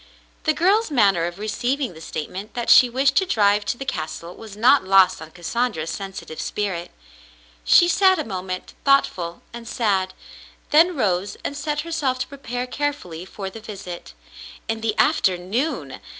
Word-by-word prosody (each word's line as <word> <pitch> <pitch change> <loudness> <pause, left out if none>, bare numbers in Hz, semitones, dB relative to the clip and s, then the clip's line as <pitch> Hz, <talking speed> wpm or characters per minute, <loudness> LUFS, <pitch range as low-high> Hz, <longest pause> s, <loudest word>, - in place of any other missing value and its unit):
The 310 - +3
girl's 400 +8 +2
manner 200 - +3
of 175 +1 -5
receiving 240 +3 -2
the 160 - -13
statement 185 +6 -6
that 240 -1 +1
she 250 - +8
wished 265 +3 +2
to 380 - +4
drive 205 - +3
to - - -2
the 270 - -6
castle 170 - -5
was 215 -3 -11
not 255 +5 +5
lost 190 -2 +4
on 160 - -9
Cassandra's 175 0 -2
sensitive 195 -5 -7
spirit. 185 -5 -3 0.7
She 345 - +6
sat 375 +2 +4
a 310 - -1
moment, 185 -4 -5
thoughtful 185 -11 +1
and 235 -1 -9
sad, 195 -6 0 0.6
then 330 +4 +5
rose 195 -6 0
and 285 - -3
set 295 +1 -2
herself 305 -6 -1
to 255 - -3
prepare 250 -3 -5
carefully 250 - -4
for 190 0 -7
the 225 - -9
visit. 195 - -9 0.5
In 225 0 -2
the 220 -1 -1
afternoon 190 - 0
215 Hz, 160 wpm, -22 LUFS, 185-275 Hz, 0.7 s, she